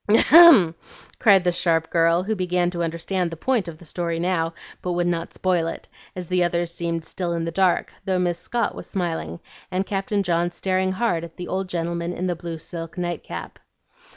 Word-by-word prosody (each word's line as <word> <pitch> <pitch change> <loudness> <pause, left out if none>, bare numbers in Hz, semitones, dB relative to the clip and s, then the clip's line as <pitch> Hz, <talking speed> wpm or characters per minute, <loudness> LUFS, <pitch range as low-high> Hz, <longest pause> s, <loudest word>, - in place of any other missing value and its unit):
"Ahem!" 230 - +8 0.5
cried 200 -5 +5
the 180 - +2
sharp 165 -2 0
girl, 165 +1 +3
who 215 +3 -1
began 180 -2 0
to 175 -1 -4
understand 170 +2 -1
the 165 - -8
point 235 0 0
of 165 -2 -7
the 175 - -14
story 170 +1 -3
now, 165 -1 0 0.3
but 180 - -2
would 175 0 0
not 170 -1 -2
spoil 180 -3 0
it, - - -6 0.3
as 180 -2 -6
the 180 0 +2
others 175 0 -1
seemed 170 -1 -3
still 175 -1 -3
in 165 -1 -2
the 165 - -3
dark, 185 0 +1
though 190 -1 0
Miss 175 -1 0
Scott 235 -3 -1
was - - -9
smiling, 165 - -3 0.3
and 185 +1 -1
Captain 200 +1 -1
John 175 -1 +1
staring 185 +1 -1
hard 190 -6 0
at 165 -1 -10
the 180 - -6
old 190 0 -3
gentleman 170 0 -2
in 180 - -3
the 180 -1 0
blue 170 -1 -6
silk 165 +1 -8
nightcap. 175 - -5
175 Hz, 200 wpm, -23 LUFS, 170-185 Hz, 0.5 s, Ahem